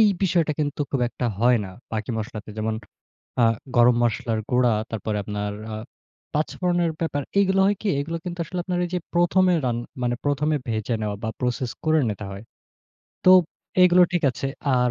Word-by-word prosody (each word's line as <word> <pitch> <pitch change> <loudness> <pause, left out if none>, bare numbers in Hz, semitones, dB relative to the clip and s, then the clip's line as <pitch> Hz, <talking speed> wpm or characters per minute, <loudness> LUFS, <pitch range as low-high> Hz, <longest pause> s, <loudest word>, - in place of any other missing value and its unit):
এই 215 - +7
বিষয়টা 170 -4 +2
কিন্তু 145 0 -2
খুব 135 - 0
একটা 120 0 -3
হয় 120 +1 +5
না - - -7 0.2
বাকি 110 +2 -2
মশলাতে। 110 -1 -6
যেমন 110 0 -1 0.7
আ - - +6 0.3
গরম 120 0 +6
মসলার 115 -1 0
গুঁড়া, 125 -2 +3 0.2
তারপরে 110 -1 -3
আপনার 105 0 -3 0.2
আ - - -3 0.6
৫ 155 - 0
ফোড়নের 175 -2 +1
ব্যাপার 145 -3 -1 0.2
এগুলো 195 -1 +3
হয় 205 - +3
কি? 215 - 0
এগুলো 165 +4 -3
কিন্তু 175 0 -5
আসলে 180 +3 -4
আপনার 180 -1 -2
এইযে 180 +1 -2
১ম 175 +2 +3
এ - - +4
রান 120 -1 0 0.2
মানে 120 0 +1
১ম 145 +1 +1
এ - - +2
ভেজে 110 +1 -1
নেওয়া 105 -1 -2
বা, 110 - -1
প্রসেস 125 -1 -1
করে 155 0 +4
নিতে 105 0 -4
হয়। 100 +2 -8 0.8
তো 185 - +8 0.5
এগুলো 180 0 +7
ঠিক 175 - +1
আছে। 135 - -4 0.3
আর 125 0 +3
130 Hz, 185 wpm, -24 LUFS, 110-175 Hz, 0.8 s, তো